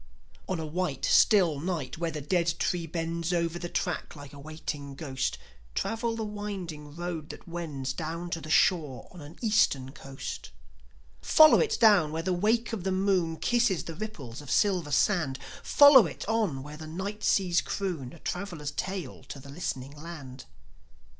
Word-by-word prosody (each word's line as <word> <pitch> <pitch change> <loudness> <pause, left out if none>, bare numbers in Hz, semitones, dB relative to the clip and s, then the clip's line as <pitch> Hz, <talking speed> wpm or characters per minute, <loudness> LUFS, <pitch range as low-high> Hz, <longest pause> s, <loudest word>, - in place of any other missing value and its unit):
On 185 -3 -1
a 160 - -3
white, 155 -3 -2
still 180 -10 +5
night, 160 -5 -3
where 170 -1 0
the 155 -2 -5
dead 170 +2 +1
tree 175 -2 -1
bends 165 +1 -2
Over 170 -1 0
the 175 0 -5
track, 180 -3 -3
like 145 -1 -11
a 140 - -11
waiting 145 -2 -6
ghost, 135 -3 -2 0.4
Travel 230 0 -1
the 225 - -3
winding 190 -8 -6
road 170 -3 -5
that - - -10
wends 150 -6 -4
Down 165 +3 -5
to 165 - -2
the 155 - -9
shore 155 -6 +2
on 180 - -11
an 145 +3 -11
Eastern 210 - +2
coast. 135 -2 -7 0.7
Follow 310 - +7
it 450 - +1
down 200 -9 +6
where 160 +1 -3
the 185 +1 0
wake 225 +6 +1
of 205 -6 -3
the 190 - 0
moon 185 -4 +1
Kisses 235 -5 +2
the 165 - -6
ripples 155 - -7
of 145 - -11
silver 185 -2 +2
sand; 155 -5 +2 0.2
Follow 285 - +8
it - - -8
on 205 -13 0
where 150 +1 -9
the 155 0 -8
night 200 +6 -5
seas 180 -3 +3
croon 170 -11 -3
A 170 - -12
traveller's 170 -4 -4
tale 180 -1 -5
to 140 - -8
the 140 +1 -12
listening 140 -3 -4
land. 145 -5 -9
170 Hz, 175 wpm, -28 LUFS, 150-190 Hz, 0.7 s, Follow